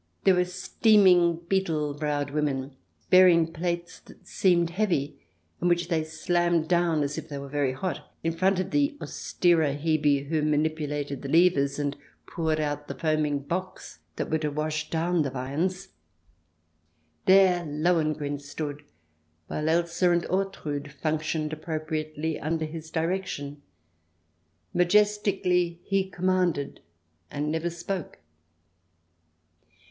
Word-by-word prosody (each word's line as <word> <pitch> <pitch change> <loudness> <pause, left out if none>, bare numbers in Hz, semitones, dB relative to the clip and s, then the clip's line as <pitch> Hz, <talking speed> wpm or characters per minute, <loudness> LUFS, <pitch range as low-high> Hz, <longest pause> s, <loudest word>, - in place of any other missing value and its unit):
There 190 - +6
were 180 0 +2
steaming, 180 -2 +4
beetle 160 -7 0
browed 145 -1 -2
women, 140 -2 -2 0.4
bearing 175 -3 +6
plates 170 +1 -3
that - - -18
seemed 170 -3 +2
heavy, 170 -7 -1 0.4
and 175 - +1
which 175 0 +1
they 160 -2 +1
slammed 175 0 0
down 170 -3 +2
as 145 +2 -2
if 160 +1 -11
they 145 - -5
were 140 0 -6
very 140 -2 0
hot, 180 +8 -5
in 165 0 0
front 190 +2 +2
of 185 +1 -3
the 290 0 +1
austerer 160 -5 +1
Hebe 145 -2 +1
who 160 0 0
manipulated 150 -2 -1
the 140 - -6
levers 150 -4 +3
and 145 -1 -2 0.3
poured 160 -2 -1
out 145 -1 -2
the - - -5
foaming 155 -3 0
Bocks 185 +6 -5 0.2
that - - -4
were 160 - +2
to 150 -1 -1
wash 155 +1 -3
down 170 +1 +1
the 140 - 0
viands. 160 +9 -3 1.4
There 185 -2 +5
Lohengrin 155 -2 0
stood, 145 0 -6 0.6
while 150 - -2
Elsa 170 +2 +2
and 175 0 +2
Ortrud 155 -7 -2
functioned 155 0 -2
appropriately 155 0 -3
under 160 +1 -1
his 160 0 -8
direction. 160 -4 -3 1.1
Majestically 180 -2 +2
he 195 -1 0
commanded 180 -5 0 0.5
and 150 +1 -2
never 160 +2 -1
spoke. 175 +1 -5
160 Hz, 125 wpm, -27 LUFS, 150-180 Hz, 1.4 s, There